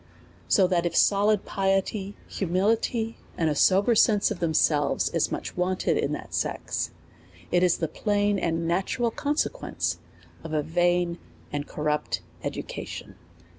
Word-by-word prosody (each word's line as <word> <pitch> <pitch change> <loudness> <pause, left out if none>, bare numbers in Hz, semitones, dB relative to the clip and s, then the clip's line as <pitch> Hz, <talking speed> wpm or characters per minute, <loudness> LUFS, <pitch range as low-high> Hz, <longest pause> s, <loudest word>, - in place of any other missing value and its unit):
So 190 - +5
that 175 -2 +1
if 170 - -4
solid 205 0 +3
piety, 195 +1 -1
humility, 220 +5 0 0.2
and 160 -2 +2
a - - -1
sober 195 +9 +4
sense 215 -1 +4
of 200 - -4
themselves, 155 -3 +2
is - - 0
much - - -4
wanted 180 +1 0
in - - 0
that - - -7
sex, - - -2 0.6
it 175 - +3
is 180 -2 +3
the 165 - -1
plain 205 +2 0
and 165 -1 -1
natural 195 +7 0
conse 290 +6 0
quence - - -3 0.5
of 160 -1 -6
a 150 -1 +1
vain 175 +2 +1 0.3
and 145 0 -3
corrupt 150 0 -2 0.2
education. - - -6
185 Hz, 140 wpm, -26 LUFS, 165-205 Hz, 0.6 s, So